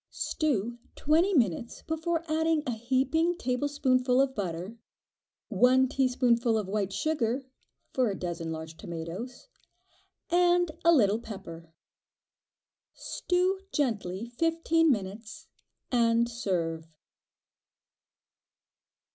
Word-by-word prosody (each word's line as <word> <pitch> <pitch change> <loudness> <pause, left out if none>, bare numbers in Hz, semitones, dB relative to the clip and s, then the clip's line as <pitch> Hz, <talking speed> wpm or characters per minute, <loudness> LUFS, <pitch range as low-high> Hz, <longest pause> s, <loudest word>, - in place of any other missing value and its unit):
Stew 240 -6 -1 0.2
twenty 325 +6 +2
minutes 230 - 0
before 320 +1 -2
adding 320 0 +1
a 250 - -1
heaping 265 +9 +1
tablespoonful 255 -2 +1
of 270 -1 +2
butter, 190 +1 -4 0.7
one 250 +5 +4
teaspoonful 245 -3 +2
of 210 -3 -2
white 200 -1 -1
sugar 255 +2 -1 0.5
(for 255 -3 +2
a 195 - -2
dozen 170 -2 -4
large 160 0 -7
tomatoes) 180 - -7 0.8
and 350 -1 +3
a 335 - +6
little 220 -8 +4
pepper. 170 -7 -9 1.2
Stew 365 +2 0
gently 210 -7 -1
fifteen 330 0 +2
minutes, 220 +7 -4 0.5
and 235 -1 +3
serve. 175 -9 -2
245 Hz, 95 wpm, -29 LUFS, 200-310 Hz, 1.2 s, a